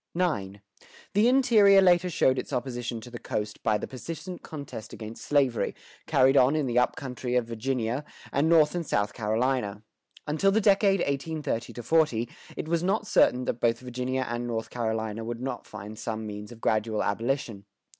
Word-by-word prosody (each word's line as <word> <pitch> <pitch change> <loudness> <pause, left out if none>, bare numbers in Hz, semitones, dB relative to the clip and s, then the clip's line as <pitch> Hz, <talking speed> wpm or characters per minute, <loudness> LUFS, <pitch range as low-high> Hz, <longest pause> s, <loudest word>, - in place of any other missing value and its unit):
IX. 100 - -1 0.5
The 210 +3 +4
interior 225 -7 +6
later 180 -1 +4
showed 130 -6 +2
its - - -6
opposition 120 -2 -3
to 125 - -11
the 120 - -7
coast 105 0 -4
by 110 -1 +2
the - - -5
persistent 165 +7 -7
contest 140 -7 -8
against 110 +1 -8
slavery, 135 -5 +1 0.3
carried 135 -2 +4
on 135 +2 +5
in 155 -2 +1
the 125 -1 +2
up 125 - +1
country 125 -2 -4
of 125 -2 +2
Virginia, 120 +2 -2 0.3
and 145 +4 +2
North 155 -3 +5
and 175 -1 -2
South 105 -8 0
Carolina. 110 -1 -1 0.4
Until 160 +7 +2
the 215 - +3
decade 195 -2 +4
1830 140 -5 -2
40, 125 -5 +2 0.3
it - - -4
was 170 0 +1
not 200 +4 0
certain 125 -10 +3
that 115 - -3
both 115 0 +2
Virginia 125 +1 -2
and 120 +1 -3
North 115 -1 -3
Carolina 110 -2 -2
would 115 +1 -4
not 125 -1 -5
find 105 +1 -9
some 110 -1 -4
means 105 +1 -7
of 115 -1 -12
gradual 110 0 +1
abolition. 115 -1 -2
125 Hz, 175 wpm, -27 LUFS, 115-155 Hz, 0.5 s, interior